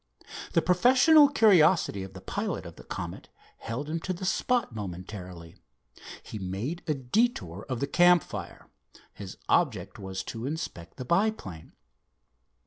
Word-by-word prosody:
The 165 - +3
professional 260 - +6
curiosity 180 - +4
of 95 0 -8
the 95 - -9
pilot - - -3
of - - -10
the - - -13
Comet - - -7 0.3
held 125 +6 -5
him 165 +2 -2
to 185 +3 -3
the 185 +1 -6
spot 235 - 0
momentarily. 90 -3 -8 0.7
He 105 - -7
made 100 - -4
a 155 - +1
detour 125 - -1
of 130 -3 -2
the - - +2
campfire. 175 +3 +2 0.5
His 95 -2 -9
object 110 - +1
was 95 -1 -5
to 115 +2 -6
inspect 90 - -6
the 130 - -6
monoplane. 170 - -1
135 Hz, 135 wpm, -28 LUFS, -, 0.7 s, professional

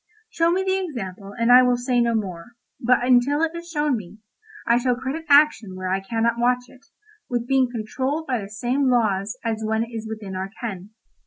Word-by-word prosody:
Show 330 -3 +2
me 370 +2 +1
the 380 0 0
example 200 - -6
and 230 +1 +2
I 250 +1 +9
will 250 -1 +3
say 245 0 +1
no 235 -1 +1
more, 190 0 -4 0.3
but 245 0 +2
until 260 +5 +3
it 325 0 0
is 340 0 -8
shown 295 -4 0
me, 210 -1 -10 0.5
I 235 +1 +3
shall 250 0 +1
credit 265 +6 -5
action 285 -9 +4
where 185 0 -4
I 190 +1 +1
cannot 230 +4 -1
watch 245 +1 +2
it, 255 - -20 0.4
with 240 -1 -2
being 265 -1 +3
controlled 260 +7 -3
by 250 -6 -1
the 195 - -8
same 245 +6 0
laws 215 -2 +1
as 220 -1 -1
when 220 +1 0
it 230 - -9
is 225 -1 -6
within 210 -3 -6
our 190 +1 -4
ken. 200 -5 -6
240 Hz, 210 wpm, -23 LUFS, 215-265 Hz, 0.5 s, I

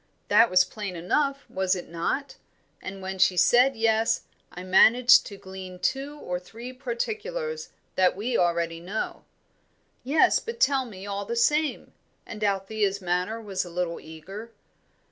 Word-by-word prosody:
That 225 +3 +6
was 185 0 +5
plain 205 -4 -6
enough, 275 - 0
was 190 0 0
it 180 - -7
not? 170 - -3 0.5
And 190 0 -7
when 190 0 -5
she 185 0 +4
said 245 +8 +5
yes, 225 0 +2 0.3
I 180 - -8
managed 240 +8 +6
to 200 - -9
glean 190 -1 -9
two 275 +9 -2
or 180 -10 -4
three 230 +7 -10
particulars, 455 - -4 0.2
that 185 -1 +3
we 230 +5 -2
already 170 -2 +1
know." 190 +6 -5 0.8
"Yes, 285 +5 +4
but 465 0 -7
tell 275 - +3
me, 195 -5 -10
all 200 0 -4
the 235 - -3
same;" 300 +6 +1 0.3
and 210 -1 -7
Althea's 200 0 0
manner 180 +4 -1
was 195 -4 -3
a 180 - -9
little 175 -1 -3
eager. 190 +8 -10
205 Hz, 150 wpm, -26 LUFS, 185-250 Hz, 0.8 s, That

